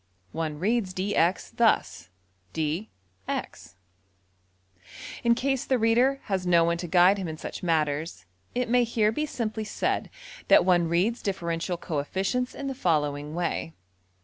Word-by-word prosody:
One 160 Hz, -2 st, -3 dB
reads 195 Hz, +1 st, 0 dB
$dx$ 185 Hz, -2 st, 0 dB
thus: -, -, +1 dB, 0.5 s
``dee 160 Hz, +7 st, -1 dB, 0.4 s
eks.'' 85 Hz, +3 st, -5 dB, 1.5 s
In 235 Hz, -1 st, +4 dB
case 270 Hz, +1 st, 0 dB
the 260 Hz, -, +1 dB
reader 245 Hz, +4 st, +3 dB
has 190 Hz, -3 st, -2 dB
no 170 Hz, -1 st, +5 dB
one 170 Hz, 0 st, +1 dB
to 175 Hz, 0 st, -5 dB
guide 180 Hz, +3 st, +5 dB
him 185 Hz, -, -3 dB
in 160 Hz, -1 st, -5 dB
such -, -, -7 dB
matters 155 Hz, -, -1 dB, 0.3 s
it 250 Hz, 0 st, 0 dB
may 245 Hz, +1 st, +4 dB
here 225 Hz, -2 st, +1 dB
be 305 Hz, +7 st, -2 dB
simply 220 Hz, -5 st, -3 dB
said 215 Hz, -, -2 dB, 0.4 s
that -, -, +6 dB
one 175 Hz, -3 st, +3 dB
reads 190 Hz, +8 st, +1 dB
differential 175 Hz, -2 st, -2 dB
coefficients 190 Hz, -, -2 dB
in 280 Hz, -, -6 dB
the 270 Hz, -, -2 dB
following 150 Hz, -, -1 dB
way. 170 Hz, -1 st, -2 dB
185 Hz, 145 wpm, -27 LUFS, 165-230 Hz, 1.5 s, that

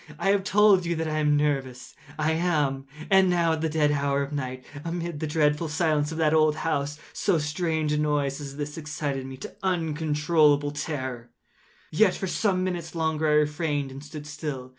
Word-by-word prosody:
I 195 Hz, +4 st, +2 dB
have 200 Hz, -1 st, +2 dB
told 200 Hz, -2 st, +5 dB
you 170 Hz, 0 st, -1 dB
that 160 Hz, 0 st, -2 dB
I 155 Hz, 0 st, -1 dB
am 150 Hz, -1 st, +3 dB
nervous: 135 Hz, -4 st, -1 dB
so -, -, -19 dB, 0.2 s
I 155 Hz, +1 st, +1 dB
am. 150 Hz, -5 st, 0 dB, 0.2 s
And 190 Hz, -1 st, +6 dB
now 170 Hz, -2 st, +2 dB
at 160 Hz, -, -3 dB
the 160 Hz, -, 0 dB
dead 150 Hz, -1 st, +2 dB
hour 140 Hz, -1 st, +1 dB
of 140 Hz, -, -7 dB
the -, -, -3 dB
night, 130 Hz, -2 st, -4 dB, 0.2 s
amid 170 Hz, -2 st, -4 dB
the 155 Hz, -, -2 dB
dreadful 150 Hz, +1 st, +1 dB
silence 155 Hz, -1 st, +1 dB
of 160 Hz, -, -5 dB
that 155 Hz, -1 st, +2 dB
old 155 Hz, -1 st, +4 dB
house, 145 Hz, -2 st, -2 dB, 0.2 s
so 190 Hz, -4 st, +1 dB
strange 155 Hz, 0 st, -1 dB
a 150 Hz, -, +1 dB
noise 145 Hz, -2 st, 0 dB
as 140 Hz, -1 st, -7 dB
this 150 Hz, +1 st, -5 dB
excited 145 Hz, -3 st, -4 dB
me 135 Hz, 0 st, -8 dB
to -, -, -9 dB
uncontrollable 155 Hz, -4 st, +2 dB
terror. 130 Hz, -5 st, -4 dB, 0.6 s
Yet, 185 Hz, +3 st, +4 dB
for -, -, -3 dB
some 185 Hz, 0 st, 0 dB
minutes 175 Hz, -2 st, -4 dB
longer 160 Hz, -1 st, 0 dB
I 150 Hz, -, +3 dB
refrained 150 Hz, -2 st, 0 dB
and 135 Hz, +2 st, -9 dB
stood 150 Hz, 0 st, -9 dB
still. 140 Hz, -4 st, -5 dB
150 Hz, 200 wpm, -26 LUFS, 145-165 Hz, 0.6 s, And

